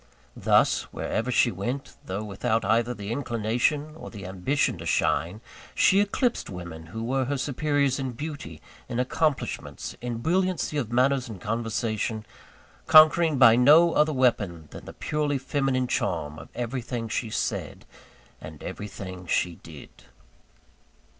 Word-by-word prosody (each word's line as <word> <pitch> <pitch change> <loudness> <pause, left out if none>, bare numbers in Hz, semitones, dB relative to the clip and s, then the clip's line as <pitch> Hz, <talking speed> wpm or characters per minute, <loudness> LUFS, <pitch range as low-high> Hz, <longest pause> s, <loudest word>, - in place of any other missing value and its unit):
Thus, - - +3
wherever 115 +3 -2
she 120 -1 +3
went, 120 +9 -4
though 95 +3 -4
without 110 +3 -1
either 115 +2 +2
the 100 +1 -6
inclination, 125 +4 -1
or - - -9
the 100 -3 -9
ambition 95 +10 0
to - - -7
shine, 90 +7 0 0.3
she 195 - +5
eclipsed 230 +4 0
women 85 -4 -8
who 110 +6 -6
were 130 +2 0
her 140 +2 -1
superiors 140 0 0
in 130 -2 -3
beauty, 140 - -7 0.3
in 120 - -2
accomplishments, 140 +3 -2
in 120 -1 -3
brilliancy 180 +4 0
of 120 -6 -2
manners 130 0 +2
and 105 -4 -8
conversation 110 0 -2 0.6
conquering 155 0 +7
by 115 -3 +8
no 155 +7 +6
other 150 +1 +3
weapon 105 - 0
than - - -10
the - - -9
purely 150 -2 -1
feminine 135 -1 0
charm 75 -10 -2
of - - -12
everything 120 -1 -3
she 110 +1 -2
said, - - -3 0.6
and 80 -1 -10
everything 95 -3 -7
she 85 0 0
did. 75 -3 -14
120 Hz, 140 wpm, -26 LUFS, 105-140 Hz, 0.6 s, by